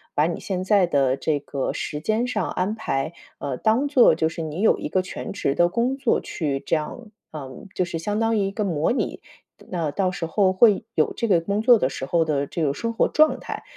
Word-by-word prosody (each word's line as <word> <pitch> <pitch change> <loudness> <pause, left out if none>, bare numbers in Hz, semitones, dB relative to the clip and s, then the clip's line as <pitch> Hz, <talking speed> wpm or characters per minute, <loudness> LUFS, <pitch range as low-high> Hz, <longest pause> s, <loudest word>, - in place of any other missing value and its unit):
把 150 - +3
你 170 - -2
现 185 -3 -3
在 195 -1 +4
的 135 -4 +2
这 150 0 -1
个 140 -1 -3
时 150 - -4
间 220 +8 0
上 215 -5 -2
安 185 +4 -1
排， 160 -8 -2 0.2
呃， 135 -3 -4
当 230 - +2
做 270 -4 +5
就 160 - +1
是 165 - -5
你 160 +4 -4
有 220 - +4
一 - - -4
个 185 - +1
全 - - -6
职 140 -8 -1
的 175 +3 +3
工 240 +7 0
作 275 - +1
去 140 -5 -3
这 - - +1
样 210 +9 -5 0.2
嗯， 135 +2 -9
就 185 - +1
是 170 -2 -4
相 205 +5 -2
当 225 0 +1
于 - - +2
一 - - -4
个 210 +1 -2
模 160 -4 0
拟 250 - -2 0.5
那 165 -5 -2
到 185 +3 0
时 175 - -4
候 190 +3 +2
会 205 +2 +4
有 - - +2
这 230 - -1
个 180 -4 +5
工 200 +5 -1
作 240 0 +6
的 130 - +1
时 135 - -5
候 165 +1 +2
的 145 -2 0
这 165 - -4
个 140 - +1
生 230 +8 -3
活 - - +2
状 310 0 +3
态。 - - -7
180 Hz, 255 characters per minute, -23 LUFS, 155-220 Hz, 0.5 s, 作